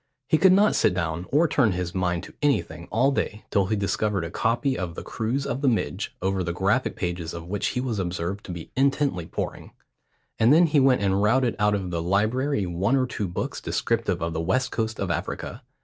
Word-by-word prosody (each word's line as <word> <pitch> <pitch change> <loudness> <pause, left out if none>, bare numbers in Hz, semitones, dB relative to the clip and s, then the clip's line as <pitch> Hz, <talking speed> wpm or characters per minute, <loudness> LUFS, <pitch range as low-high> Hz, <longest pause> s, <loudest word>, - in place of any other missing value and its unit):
He 155 - +3
could 190 - +6
not 205 +3 +5
sit 90 - +3
down 85 0 -2
or 155 +5 +4
turn 120 -10 +2
his 90 -1 -3
mind 90 -2 -1
to - - -11
anything 85 - 0
all 130 +5 +3
day 110 -6 -3
till 100 -3 +2
he 110 - 0
discovered 100 -1 0
a 85 - -6
copy 120 - 0
of 85 -6 -4
the - - -6
Cruise 125 +5 -2
of 135 - -3
the 145 - +1
Midge, 120 -4 -1
over 95 0 0
the 85 0 -2
graphic 100 +8 +1
pages 85 -2 -3
of 85 -1 -7
which 100 +3 -2
he - - +2
was 120 -5 -2
observed 90 +2 -3
to - - -6
be 85 -2 -8
intently 135 - +1
poring; - - -5 0.7
and 115 +3 +5
then 165 +4 +7
he 150 -2 +3
went 130 -5 +4
and 95 0 +2
routed 120 +3 +2
out 105 0 +3
of 95 -3 -3
the 85 -1 -1
library 110 - +1
one 90 +8 0
or 130 -1 +2
two 105 -5 -3
books 90 - -4
descriptive 110 -7 -1
of 85 0 -2
the 80 - -2
west 130 +10 0
coast 110 -1 -2
of 95 -3 -1
Africa. - - -4
105 Hz, 220 wpm, -25 LUFS, 90-130 Hz, 0.7 s, then